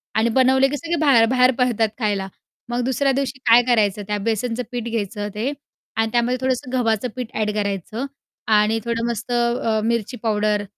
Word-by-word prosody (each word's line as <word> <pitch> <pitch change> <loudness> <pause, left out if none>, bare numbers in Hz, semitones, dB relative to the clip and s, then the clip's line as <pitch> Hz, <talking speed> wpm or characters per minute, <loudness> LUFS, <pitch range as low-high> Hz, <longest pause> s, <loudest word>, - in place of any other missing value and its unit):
आणि 220 +2 +2
बनवले 265 +1 +4
की 290 - -2
सगळे 335 +2 -2
बाहेर 235 -5 +6
बाहेर 255 0 +4
पडतात 230 -3 +2
खायला. 200 -3 -1 0.4
मग 240 +1 -1
दुसऱ्या 270 +2 +1
दिवशी 265 -1 -2
काय 235 +1 +8
करायचं 210 -4 +2
त्या 210 0 -1
बेसनचं 230 +2 -1
पीठ 240 -2 -3
घ्यायचं 210 -2 -3
ते 235 +7 -1 0.5
आणि 225 0 +1
त्यामध्ये 240 +1 +1
थोडंसं 255 -1 -1
गव्हाचं 230 -1 +1
पीठ 250 -2 -5
अ‍ॅड 210 -1 0
करायचं 205 +4 -3 0.5
आणि 215 +1 +3
थोडं 235 0 -1
मस्त 235 +1 -4
अ, 235 -2 +1
मिरची 235 +1 -1
पावडर, 210 -1 +1
235 Hz, 175 wpm, -21 LUFS, 215-250 Hz, 0.5 s, काय